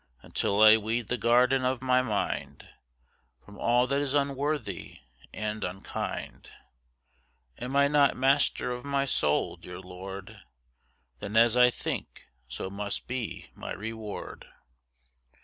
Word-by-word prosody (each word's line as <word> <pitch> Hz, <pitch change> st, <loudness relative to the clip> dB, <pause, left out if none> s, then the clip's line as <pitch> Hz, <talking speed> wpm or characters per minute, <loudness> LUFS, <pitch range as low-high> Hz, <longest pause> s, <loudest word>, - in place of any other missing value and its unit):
Until 100 Hz, +2 st, +1 dB
I 110 Hz, 0 st, +9 dB
weed 110 Hz, +1 st, -2 dB
the 125 Hz, -, +1 dB
garden 125 Hz, +3 st, +3 dB
of 130 Hz, 0 st, 0 dB
my 130 Hz, 0 st, +4 dB
mind 110 Hz, -5 st, -3 dB, 0.8 s
From 100 Hz, 0 st, -13 dB
all 120 Hz, +1 st, +3 dB
that 140 Hz, +2 st, 0 dB
is 145 Hz, -1 st, -1 dB
unworthy 140 Hz, -, -2 dB, 0.3 s
and 110 Hz, 0 st, -4 dB
unkind, 90 Hz, +2 st, -5 dB, 1.1 s
Am 125 Hz, +3 st, -4 dB
I 140 Hz, 0 st, +5 dB
not 145 Hz, -1 st, +3 dB
master 135 Hz, -1 st, +2 dB
of 125 Hz, 0 st, -5 dB
my 140 Hz, -1 st, 0 dB
mind, -, -, 0 dB
dear 90 Hz, 0 st, -9 dB
Lord? 95 Hz, +1 st, -9 dB, 0.8 s
Then 105 Hz, +2 st, -3 dB
as 115 Hz, 0 st, +6 dB
I 125 Hz, 0 st, +7 dB
think, -, -, -5 dB, 0.2 s
so -, -, -5 dB
must 100 Hz, 0 st, -3 dB
be 125 Hz, -3 st, -5 dB
my -, -, -6 dB
reward. 110 Hz, 0 st, -7 dB
120 Hz, 130 wpm, -28 LUFS, 105-130 Hz, 1.1 s, I